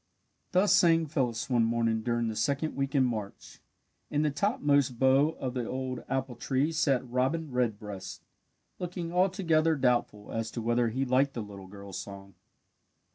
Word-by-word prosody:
'" - - -46
Thus 195 +2 +4
sang 165 -3 +5
Phyllis 130 -7 -1
one 120 -3 +2
morning 115 -1 +1
during 120 0 0
the 110 - -3
second 140 +8 -1
week 135 +1 -2
in 135 - +5
March. 110 -5 -5 0.5
In 150 +1 +1
the 150 - +1
topmost 145 - +1
bough 135 +5 +4
of 130 -2 -3
the 125 -3 -3
old 130 -1 -4
apple 130 -1 -2
tree 140 +6 0
sat 140 -6 +1
Robin 130 +5 -1
Redbreast, 105 -6 -3 0.5
looking 175 -1 -4
altogether 175 -4 +2
doubtful 120 -6 0
as 115 0 -2
to - - -4
whether 120 0 +2
he 130 +4 -1
liked 135 +2 +2
the 115 - -3
little 100 -2 -10
girl's 100 0 -8
song. 100 -1 -9
130 Hz, 165 wpm, -29 LUFS, 115-150 Hz, 0.5 s, sang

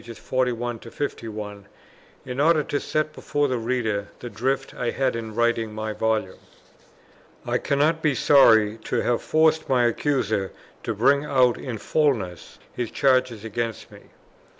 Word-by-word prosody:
41 120 0 -2
51, 110 -5 -6 0.6
in 125 +1 -5
order 155 +1 +4
to 145 - -2
set 155 0 -2
before 145 0 -1
the 130 -3 -1
reader 110 -4 -1
the 120 - -8
drift 135 +3 -2
I 120 - -2
had 130 -1 0
in 110 -2 -6
writing 115 -2 0
my 110 0 -3
Volume: 110 -4 -1 1.1
I - - 0
cannot 150 +3 +1
be 150 -4 +1
sorry 110 -6 +5
to - - 0
have 120 -1 0
forced 160 0 +2
my 125 -2 +3
Accuser 115 -6 0 0.3
to 115 - -3
bring 140 +6 +3
out 130 -4 +2
in 125 -4 -5
fulness 105 - -1 0.2
his 120 -3 -3
charges 130 -5 +1
against 115 0 -4
me. - - -15
120 Hz, 145 wpm, -24 LUFS, 110-140 Hz, 1.1 s, sorry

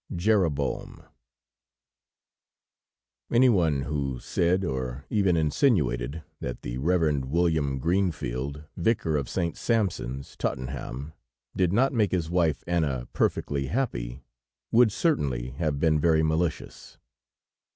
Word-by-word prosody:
JEROBOAM 85 -7 0 2.3
Anyone 95 - +4
who 70 -4 -2
said, 90 +7 +1
or 65 -1 -4
even 95 -5 +3
insinuated, 75 - +1 0.2
that 60 - -5
the - - -4
Reverend 75 -3 +1
William 80 -2 +1
Greenfield, 75 -4 -1
Vicar 85 -4 +1
of 70 -4 -1
St. 85 -3 -1
Sampson's, 90 - -1
Tottenham, 65 +3 -4 0.4
did 90 -2 +2
not 130 +8 +3
make 105 -6 +2
his 85 -3 -1
wife 85 -6 +1
Anna 75 -8 -1
perfectly 70 -2 0
happy, 65 - -2 0.5
would 115 -1 +5
certainly 65 - 0
have 70 +1 -2
been 80 0 +3
very 80 0 +3
malicious. 80 +1 -2
80 Hz, 105 wpm, -27 LUFS, 70-90 Hz, 2.3 s, would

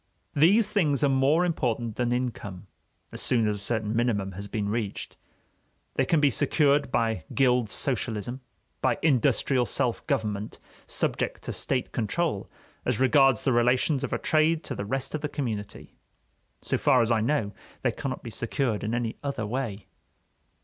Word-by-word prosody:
These 205 +8 +4
things 150 - +2
are 140 - +4
more 135 +6 +3
important 120 -9 -1
than 120 -1 0
income, 115 -7 -3 0.5
as - - -5
soon 115 -3 +2
as 105 -1 0
a 100 - -5
certain 110 -1 -1
minimum 110 -5 0
has 100 +2 -7
been 105 0 -2
reached. 105 -1 -3 0.8
They - - +1
can 165 - +3
be 145 -2 +4
secured 145 +1 +2
by 115 -8 0
gild 125 -4 +3
socialism, 120 -1 -2 0.4
by - - +2
industrial 130 -3 +2
self 125 -4 -1
government 105 -1 -2 0.3
subject - - -1
to - - -4
state 130 -2 -1
control 120 - -1 0.3
as 125 -2 0
regards 135 -2 +4
the 130 - +2
relations 125 +4 +2
of - - -3
a - - +1
trade 155 +1 +2
to - - -5
the 100 - -4
rest 135 +5 -3
of 155 - -2
the 150 - -2
community. 115 -8 -5 0.7
So - - 0
far 125 -3 +4
as 115 - 0
I 110 -2 +3
know, 115 -4 0 0.3
they - - +2
cannot - - -5
be - - -7
secured 120 -7 -1
in 110 +2 -1
any 120 -2 -2
other 140 -6 -3
way. 110 -3 -3
125 Hz, 165 wpm, -27 LUFS, 110-140 Hz, 0.8 s, These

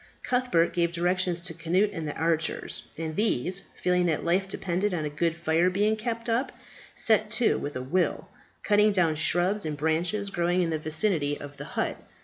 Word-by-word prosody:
Cuthbert 245 -10 +1
gave 170 -1 +1
directions 180 +1 0
to 170 -1 -4
Cnut 175 +6 +1
and 165 -4 -4
the 150 - -4
archers; 160 -1 -1
and 160 -1 -4
these, 190 - 0
feeling 180 -1 +1
that 160 -3 0
life 185 +3 +1
depended 190 +1 -1
upon 155 -3 -2
a 150 - -3
good 165 +2 0
fire 170 +1 +2
being 205 +4 +1
kept 230 +1 -4
up, 235 +3 0 0.4
set 215 -1 +3
to 230 +1 +2
with 145 - -5
a 130 - -3
will, 175 +7 0 0.4
cutting 210 0 +4
down 170 -5 +2
shrubs 175 +6 +1
and 150 -2 -3
branches 175 +7 0
growing 175 0 +1
in 165 - -1
the 160 - -1
vicinity 155 -2 +1
of 145 0 -9
the 145 - -7
hut. - - 0
175 Hz, 185 wpm, -27 LUFS, 160-200 Hz, 0.4 s, cutting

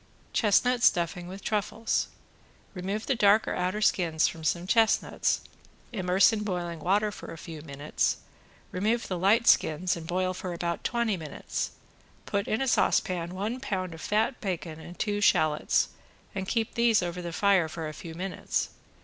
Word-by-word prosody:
~CHESTNUT 240 +3 +3
STUFFING 175 -3 +2
WITH 190 +2 -9
TRUFFLES~ 215 +1 0 0.7
Remove 195 +3 -3
the - - +2
dark 210 -2 +4
or - - -1
outer 185 +4 -1
skins 165 -6 +3
from 160 - -6
some 170 +3 0
chestnuts, 225 +3 +2 0.5
immerse 190 -1 +4
in 215 - -1
boiling 175 -5 -3
water 205 +5 +2
for - - -9
a 165 - -8
few 160 -1 -8
minutes, 145 -1 -1 0.5
remove 220 +6 0
the 185 - -2
light 215 +6 +4
skins 175 -1 +3
and 165 -1 -8
boil 185 +1 0
for 180 -1 -5
about 170 0 -3
twenty 235 -4 0
minutes, 155 -4 -4 0.6
put 200 0 -1
in 220 +4 0
a - - -1
saucepan 180 -7 +1
one 215 +6 -2
pound 185 -9 -3
of 160 - -10
fat 220 +5 0
bacon 170 -5 -4
and 175 +2 -10
two 205 -1 -1
shallots, 155 -6 +3 0.4
and 190 -2 -4
keep 225 +1 -1
these 235 -4 +3
over 175 +1 -3
the 170 -1 -5
fire 190 -2 +3
for 160 0 -5
a 155 - -6
few 160 +2 -9
minutes. 185 +2 -2
185 Hz, 165 wpm, -28 LUFS, 170-215 Hz, 0.7 s, dark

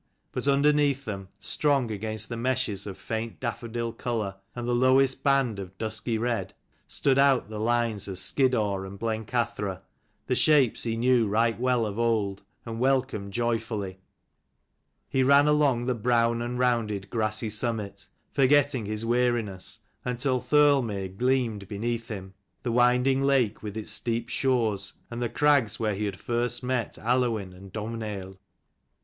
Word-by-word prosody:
But - - -4
underneath 140 -1 +3
them, 95 -4 -5
strong 140 -6 +1
against 110 +1 -4
the 115 - -5
meshes 120 -4 -1
of 95 - -6
faint 110 0 -4
daffodil 115 -1 -3
colour, 110 -5 -3 0.2
and 120 -1 -4
the 120 - +1
lowest 130 +2 +3
band 135 -7 +2
of 95 -1 -8
dusky 110 +2 -2
red, 115 +1 -2 0.3
stood 135 -1 +1
out 135 -6 +4
the 105 - -5
lines 115 -2 0
of 95 - -5
Skiddaw 110 -3 +3
and 95 +1 -8
Blencathra, 110 -3 -2 0.4
the - - 0
shapes 140 -8 +3
he 115 -1 -1
knew 120 -1 +3
right 115 +2 +1
well 125 -2 +2
of 105 +1 -4
old, 110 -4 0 0.2
and 115 -1 -5
welcomed 130 -6 0
joyfully. 110 -5 -2 1.1
He 135 - +1
ran 140 +2 +5
along 145 -5 +3
the 125 - +1
brown 115 0 +1
and 120 +1 -3
rounded 110 -6 0
grassy 110 -1 -1
summit, 110 -1 -1 0.3
forgetting 135 -4 +3
his 110 +1 -3
weariness, 120 -5 -1 0.2
until 125 +1 -1
Thirlmere 135 -10 +3
gleamed 120 -4 0
beneath 115 +3 -3
him, 95 -3 -7 0.3
the 120 - -1
winding 125 +3 +3
lake 135 -6 +2
with 105 0 -6
its 110 0 -2
steep 115 +2 -1
shores, 115 -8 0 0.2
and 120 +1 -5
the 120 - 0
crags 140 -3 +2
where 110 -2 0
he 105 +2 -2
had 100 -2 -4
first 120 +1 -1
met 125 -2 -2
Aluinn 115 -5 0
and 95 +1 -13
Domhnaill. 105 -3 -5
115 Hz, 150 wpm, -27 LUFS, 105-125 Hz, 1.1 s, ran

